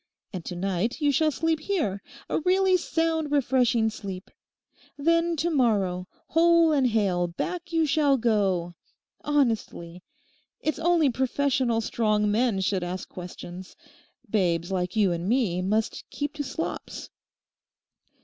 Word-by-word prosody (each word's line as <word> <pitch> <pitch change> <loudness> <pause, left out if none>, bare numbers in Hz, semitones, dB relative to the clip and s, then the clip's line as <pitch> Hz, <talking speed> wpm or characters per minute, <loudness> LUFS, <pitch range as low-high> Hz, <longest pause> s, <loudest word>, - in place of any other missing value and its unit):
And 180 -3 -5
to 180 - -5
night 195 - -1
you 295 -2 +2
shall 310 +2 +2
sleep 325 +1 0
here—a 305 - -3
really 370 +3 +3
sound, 325 -3 0
refreshing 250 -5 +2
sleep. 195 -3 -8 0.7
Then 335 +3 +2
to 330 +3 -1
morrow, 200 - +1 0.2
whole 335 0 +4
and 275 -4 +3
hale, 195 -6 +1
back 345 - -5
you 325 -1 +2
shall 285 -2 +3
go; 195 -7 +1 0.5
honestly. 225 -11 -1 0.6
It's 310 - -2
only 330 -4 +3
professional 260 -2 0
strong 215 -2 +1
men 220 -2 +1
should 190 -1 0
ask 180 +1 -5
questions. 180 0 -9 0.5
Babes 175 -4 0
like 180 0 -2
you 205 -4 +3
and 170 +2 -2
me 220 -8 +1
must 210 +4 -1
keep 290 0 -4
to 300 -1 -4
slops. 320 +4 -5
235 Hz, 130 wpm, -26 LUFS, 190-310 Hz, 0.7 s, whole